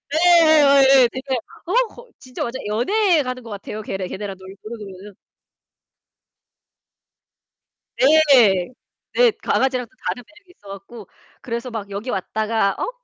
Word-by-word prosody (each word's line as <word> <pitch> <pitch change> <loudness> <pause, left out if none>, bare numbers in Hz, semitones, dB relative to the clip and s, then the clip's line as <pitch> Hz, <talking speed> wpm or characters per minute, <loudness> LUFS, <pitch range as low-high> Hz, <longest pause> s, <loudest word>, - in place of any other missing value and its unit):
예예예예, 290 -6 +5
되게 260 0 -4 0.3
어 360 - -4
거 485 +2 -15
진짜 255 -1 -7
완전 240 +2 -5
연애 335 - +1
하는 255 -1 -6
것 230 - -11
같아요. 210 +1 -7
걔네 190 -2 -5
걔네랑 195 +1 -6
놀면은. 200 0 -11 2.8
네. 260 - +4 0.4
네. - - +5
강아지랑은 255 -2 0
또 245 - -32
다른 245 - -3
매력이 360 - -22
있어 205 - -19
갖고 200 +2 -11 0.3
그래서 235 +1 -5
막 215 -3 -6
여기 200 +5 -6
왔다가 215 0 -1
어? - - -3
245 Hz, 255 characters per minute, -20 LUFS, 205-285 Hz, 2.8 s, 예예예예